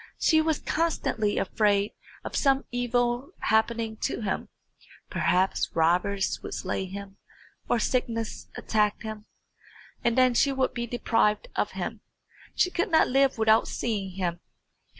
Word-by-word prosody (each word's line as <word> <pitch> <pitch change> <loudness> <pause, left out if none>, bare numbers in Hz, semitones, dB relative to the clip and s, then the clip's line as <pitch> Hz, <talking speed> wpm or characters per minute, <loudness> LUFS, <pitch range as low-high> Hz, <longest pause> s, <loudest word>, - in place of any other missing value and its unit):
She 315 -1 +4
was 315 -1 +1
constantly 300 -10 -1
afraid 205 0 +1 0.3
of - - -6
some 275 -1 +2
evil 245 +4 0
happening 220 0 +1
to - - -2
him 200 -3 -3 0.6
perhaps 185 +2 +1
robbers 180 +4 +1
would - - -6
slay 190 - -2
him, 195 +1 -8 0.5
or - - +3
sickness 230 -1 -2
attack 210 -1 0
him, 215 -1 -7 0.8
and 235 0 +1
then 255 -1 +5
she 275 +4 +3
would 265 -1 0
be 235 0 -3
deprived 225 - +1
of - - -1
him. - - -5 0.5
She 360 - +2
could 365 +5 0
not 320 - +4
live 270 0 +3
without 220 0 +4
seeing 200 -5 -3
him. 175 -3 -2
225 Hz, 135 wpm, -27 LUFS, 205-255 Hz, 0.8 s, then